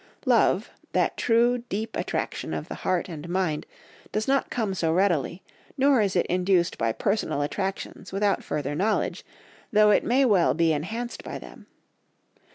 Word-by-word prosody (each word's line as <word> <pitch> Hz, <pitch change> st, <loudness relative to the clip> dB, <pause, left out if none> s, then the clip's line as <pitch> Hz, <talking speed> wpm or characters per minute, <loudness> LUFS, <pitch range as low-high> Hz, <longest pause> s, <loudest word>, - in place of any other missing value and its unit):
Love, -, -, +3 dB, 0.2 s
that -, -, +1 dB
true 240 Hz, +1 st, +3 dB
deep 215 Hz, +3 st, -3 dB
attraction -, -, -3 dB
of -, -, -5 dB
the -, -, -6 dB
heart 185 Hz, 0 st, 0 dB
and 165 Hz, -2 st, -8 dB
mind, 175 Hz, -4 st, -1 dB, 0.4 s
does 215 Hz, +1 st, -1 dB
not 275 Hz, 0 st, +2 dB
come 220 Hz, -6 st, -1 dB
so 165 Hz, -3 st, 0 dB
readily, 175 Hz, -2 st, +1 dB, 0.3 s
nor 270 Hz, -3 st, +4 dB
is 200 Hz, -2 st, 0 dB
it 175 Hz, -, +3 dB
induced 180 Hz, -1 st, +1 dB
by 115 Hz, 0 st, 0 dB
personal 195 Hz, -, -1 dB
attractions 190 Hz, +3 st, -4 dB
without 200 Hz, +1 st, +1 dB
further 145 Hz, -1 st, -3 dB
knowledge, 200 Hz, +8 st, 0 dB, 0.5 s
though 210 Hz, 0 st, +5 dB
it -, -, +4 dB
may 265 Hz, +3 st, +3 dB
well 200 Hz, -8 st, +3 dB
be 165 Hz, -1 st, +3 dB
enhanced 220 Hz, +11 st, -4 dB
by -, -, -6 dB
them. -, -, -13 dB
190 Hz, 160 wpm, -26 LUFS, 170-220 Hz, 0.5 s, though